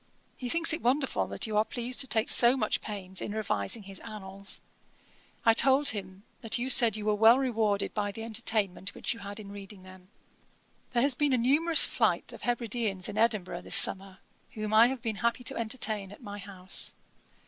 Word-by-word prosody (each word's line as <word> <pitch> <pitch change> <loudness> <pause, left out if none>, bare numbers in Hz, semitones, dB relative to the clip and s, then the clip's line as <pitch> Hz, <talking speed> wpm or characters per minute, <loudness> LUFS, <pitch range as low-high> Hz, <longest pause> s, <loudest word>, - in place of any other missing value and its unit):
He 250 - -6
thinks 330 +3 +3
it 325 - -3
wonderful 265 +3 0
that - - 0
you 215 -2 -4
are 215 - +4
pleased 245 0 -2
to 270 - +5
take 220 -1 0
so 240 +2 +6
much 215 -4 0
pains 190 -3 -6
in 205 - -5
revising 210 - -1
his 195 -1 -7
Annals. 200 -2 -6 0.9
I 225 - +6
told 270 +4 +4
him 195 -4 -6 0.2
that 225 +1 +2
you 255 +2 -2
said 235 -4 +5
you 210 - -6
were 215 - +2
well 225 +3 +6
rewarded 220 -6 -1
by 205 -1 -2
the 225 +3 -8
entertainment 215 -4 -2
which - - -1
you 230 - -12
had 200 0 -7
in 200 -2 -10
reading 200 -1 -11
them.' 185 -1 -15 0.9
'There 240 0 +2
has 280 0 +3
been 285 +1 0
a - - +3
numerous 300 +7 +3
flight - - -1
of - - -12
Hebrideans 230 -5 -2
in 210 - -7
Edinburgh 215 -5 0
this - - 0
summer, 190 0 +1 0.4
whom 215 0 -5
I 225 +2 +7
have 255 -2 -5
been 220 -3 -3
happy 235 +3 -1
to - - -3
entertain 220 -4 -3
at 205 - -14
my 205 -1 -8
house. 190 -2 0
220 Hz, 200 wpm, -28 LUFS, 200-245 Hz, 0.9 s, I